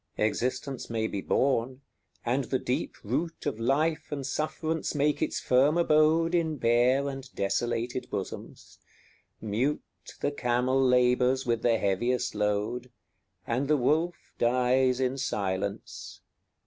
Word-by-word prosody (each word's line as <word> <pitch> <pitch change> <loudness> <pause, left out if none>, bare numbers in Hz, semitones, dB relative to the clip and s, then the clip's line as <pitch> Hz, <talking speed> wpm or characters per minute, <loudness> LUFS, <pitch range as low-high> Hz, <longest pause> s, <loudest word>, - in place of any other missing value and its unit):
XXI. - - 0
Existence 130 +4 -2
may 110 -1 -1
be 100 -3 -3
borne, 130 +1 0 0.4
and 125 +3 +1
the 130 - 0
deep 125 0 -2
root 150 +10 -3
Of 140 -7 -2
life 155 +7 0
and 140 -2 -3
sufferance 155 +3 -2
make 145 0 +1
its - - 0
firm 135 +6 +3
abode 165 +1 +3
In 160 -3 +1
bare 125 +3 +3
and 135 -1 -6
desolate 120 +5 -1
bosoms: - - -7 0.6
mute 115 +7 -1 0.4
The - - 0
camel 130 0 +1
labours 125 +1 +3
with 115 -2 0
the 115 -1 +3
heaviest 110 +5 0
load, 105 +4 -1 0.6
And 125 +4 -1
the 150 0 +3
wolf 160 +7 0
dies 125 +1 +2
in 130 +1 0
silence. 100 -5 -3
130 Hz, 130 wpm, -28 LUFS, 120-145 Hz, 0.6 s, firm